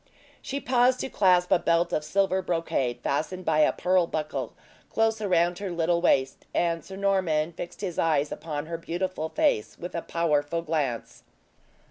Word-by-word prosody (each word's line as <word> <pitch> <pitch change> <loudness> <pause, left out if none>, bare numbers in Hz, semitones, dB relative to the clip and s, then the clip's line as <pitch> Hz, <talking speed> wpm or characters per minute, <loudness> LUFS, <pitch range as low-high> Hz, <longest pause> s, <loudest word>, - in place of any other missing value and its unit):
She 275 - -4
paused 255 -1 +3
to - - -3
clasp 180 -5 +3
a - - +5
belt 170 +1 +1
of 150 - 0
silver 190 +4 +1
brocade, 140 -9 -1
fastened 175 +6 -2
by 155 -1 +2
a 155 - +5
pearl 180 -1 +2
buckle, 155 -1 -3 0.4
close 225 0 +1
around 175 -3 +2
her 200 -1 -4
little 170 0 +1
waist, 135 -6 +1
and 170 -1 +1
Sir 190 - -9
Norman 185 -5 +1
fixed 175 +3 -8
his 185 -5 -3
eyes 150 -3 +2
upon 150 -2 -4
her 165 +1 -5
beautiful 175 -1 -3
face, 105 - 0
with 175 - -7
a 170 - -2
powerful 165 -1 0
glance. 150 -7 -2
170 Hz, 165 wpm, -27 LUFS, 155-185 Hz, 0.4 s, a